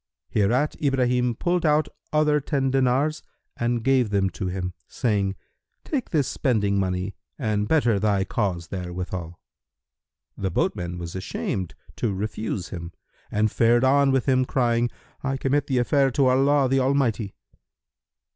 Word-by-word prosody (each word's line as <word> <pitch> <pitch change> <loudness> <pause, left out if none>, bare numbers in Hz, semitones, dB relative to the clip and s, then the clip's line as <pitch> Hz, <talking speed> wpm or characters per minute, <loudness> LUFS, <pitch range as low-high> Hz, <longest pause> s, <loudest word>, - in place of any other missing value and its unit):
Hereat 120 +8 +1
Ibrahim 125 -3 +1
pulled 175 +6 0
out 150 -1 +3 0.2
other 150 -1 +3
ten 135 -2 0
dinars 135 +4 +2 0.3
and 120 -1 -1
gave 130 -3 +3
them 100 -2 +1
to 95 - -4
him, 90 0 -3
saying, 100 -4 0 0.5
"Take 275 -6 -2
this 145 -6 +1
spending 100 -7 +1
money 95 +1 -1 0.2
and 105 -5 0
better 120 -9 +3
thy 100 -2 +2
case 95 -4 -2
therewithal." 90 -1 -5 1.0
The 95 - -2
boatman 90 0 -1
was 85 0 -6
ashamed 95 -1 -3 0.2
to 105 -5 -1
refuse 105 -2 -3
him 85 -2 -7 0.4
and 105 0 +1
fared 120 +1 +3
on 140 +1 +4
with 135 -2 +1
him 130 -1 +4
crying 120 -2 +1 0.3
"I 135 0 -1
commit 135 +2 0
the 130 - 0
affair 135 +3 +3
to 135 +1 +2
Allah 135 +2 +3
the 135 +1 +2
Almighty!" 130 -6 +1
120 Hz, 140 wpm, -24 LUFS, 95-135 Hz, 1.0 s, on